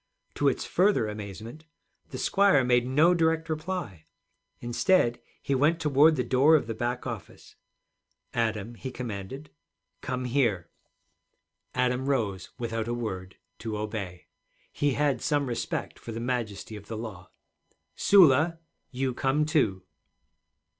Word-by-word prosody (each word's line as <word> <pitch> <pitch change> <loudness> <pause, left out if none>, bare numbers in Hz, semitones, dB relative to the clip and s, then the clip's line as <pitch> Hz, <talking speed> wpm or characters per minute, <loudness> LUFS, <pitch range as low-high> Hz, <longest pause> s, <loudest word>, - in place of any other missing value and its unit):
To 145 - +1
its 135 - +1
further 185 - +2
amazement, 105 - -8 0.4
the - - -6
squire 195 -9 +4
made 125 0 +3
no 155 +7 +4
direct 165 -1 +1
reply. 155 - -4 0.5
Instead 120 +1 +2 0.2
he 140 - 0
went 150 +5 +3
toward 150 +1 +5
the 125 - 0
door 130 +6 +5
of 150 - +2
the 115 - -4
back 120 +2 -3
office. 115 -7 -8 0.8
'Adam,' 110 -1 -1
he 130 +3 -7
commanded, 125 +3 -6 0.5
'come 125 0 -3
here.' 115 -10 0 1.0
Adam 125 +1 +1
rose 100 -9 -1
without 115 -2 -3
a 120 - -1
word, 95 -5 -5 0.2
to 110 -1 -4
obey. 105 -5 -5 0.5
He 145 -1 0
had 140 -3 +1
some 145 -2 +1
respect 120 -3 -4
for 115 - -8
the 115 - -5
majesty 115 -4 -3
of 105 -1 -11
the 110 - -5
law. 100 -5 -8 0.7
'Sula, 165 -3 +5 0.3
you 130 0 -2
come, 135 +4 +1
too.' 110 - +1
125 Hz, 135 wpm, -27 LUFS, 110-145 Hz, 1.0 s, toward